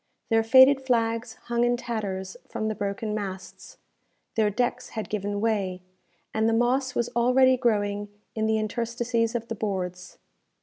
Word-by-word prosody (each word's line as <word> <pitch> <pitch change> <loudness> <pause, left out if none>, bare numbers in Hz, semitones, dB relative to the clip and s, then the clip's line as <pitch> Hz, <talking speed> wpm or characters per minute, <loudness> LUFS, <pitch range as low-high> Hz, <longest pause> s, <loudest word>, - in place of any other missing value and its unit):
Their 225 -1 +4
faded 260 +4 +7
flags 230 -2 0
hung 235 0 +1
in 240 0 +2
tatters 200 -6 -4
from 215 - -2
the - - -1
broken 205 +1 -3
masts; 195 -3 -6 0.6
their 220 -2 +2
decks 245 +3 -1
had 220 -4 -5
given 205 -1 -2
way; 195 -5 -1 0.5
and 220 +1 +2
the - - +1
moss 250 +3 +1
was 235 - 0
already 255 +2 +5
growing 205 -4 0 0.2
in 220 0 -1
the 220 0 +2
interstices 230 +1 -1
of 230 -1 -3
the 230 - -3
boards. 180 -4 -4
225 Hz, 155 wpm, -26 LUFS, 205-240 Hz, 0.6 s, faded